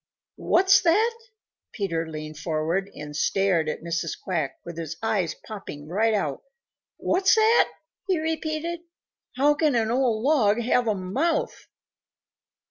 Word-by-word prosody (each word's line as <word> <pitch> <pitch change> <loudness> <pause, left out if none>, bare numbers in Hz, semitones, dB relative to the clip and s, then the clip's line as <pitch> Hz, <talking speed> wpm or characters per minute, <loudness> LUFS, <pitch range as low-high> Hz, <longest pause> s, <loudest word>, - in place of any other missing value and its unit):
"What's 385 +2 +4
that?" 435 +8 +3 0.6
Peter 195 -6 -2
Rabbit 165 0 -4
leaned 155 0 -7
forward 165 +5 -1
and 150 0 -8
stared 180 -1 +1
at 155 - -5
Mrs. 165 -1 -3
Quack 160 -7 -3
with 170 - -7
his 165 -1 -5
eyes 200 -7 0
popping 170 -9 -9
right 215 +6 +1
out. 150 -9 -2 0.6
"What's 385 +4 +3
that?" 445 +1 +4 0.4
he 375 -2 +2
repeated. 320 +1 -2 0.6
"How 285 +3 +4
can 295 -2 +1
an 225 -1 +1
old 240 -3 +1
log 240 -7 +3
have 245 0 +1
a 215 - +2
mouth?" 240 - -2
215 Hz, 135 wpm, -25 LUFS, -, 0.6 s, What's